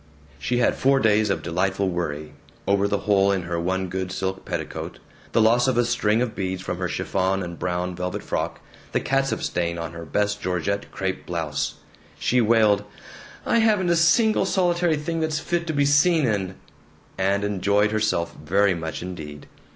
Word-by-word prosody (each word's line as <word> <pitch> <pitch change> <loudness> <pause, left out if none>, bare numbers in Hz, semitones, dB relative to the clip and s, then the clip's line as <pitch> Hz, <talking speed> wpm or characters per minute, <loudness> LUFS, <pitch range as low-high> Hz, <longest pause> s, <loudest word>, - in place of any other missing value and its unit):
She 120 - -1
had 120 - +3
four 135 +1 +3
days 110 -2 +3
of 100 - -1
delightful 95 +3 0
worry 75 -4 -3 0.3
over 100 0 +3
the 100 0 -1
hole 100 -1 +4
in 95 -2 0
her 85 0 -3
one 95 +2 -1
good 95 +1 -3
silk 95 0 -3
petticoat, - - -5 0.3
the 115 - +3
loss 120 +3 +4
of 130 -3 +1
a 120 - +3
string 115 -1 +2
of 120 - -3
beads 95 -1 -3
from - - -4
her - - -1
chiffon 95 0 -1
and 85 -1 -7
brown 90 0 -2
velvet 90 +1 -4
frock, - - -3 0.3
the - - +2
catsup 135 0 0
stain 85 -1 -1
on 85 -1 -4
her 85 0 -8
best 105 +6 -1
georgette 95 +2 -2
crepe 95 -1 -3
blouse. 80 -5 -2 0.4
She 125 0 +2
wailed, 110 -3 +4 0.6
"I 230 - +3
haven't 210 -5 +3
a - - +4
single 195 +6 +4
solitary 175 -3 +2
thing 165 +2 -3
that's 160 -1 0
fit 170 +2 -2
to 160 - -1
be 145 -1 +2
seen 150 +2 +4
in," 95 -5 -1 0.6
and 100 +1 +1
enjoyed 105 +1 +1
herself 105 -6 0
very 100 +5 +3
much 80 0 -5
indeed. 75 -5 -8
100 Hz, 180 wpm, -24 LUFS, 90-125 Hz, 0.6 s, hole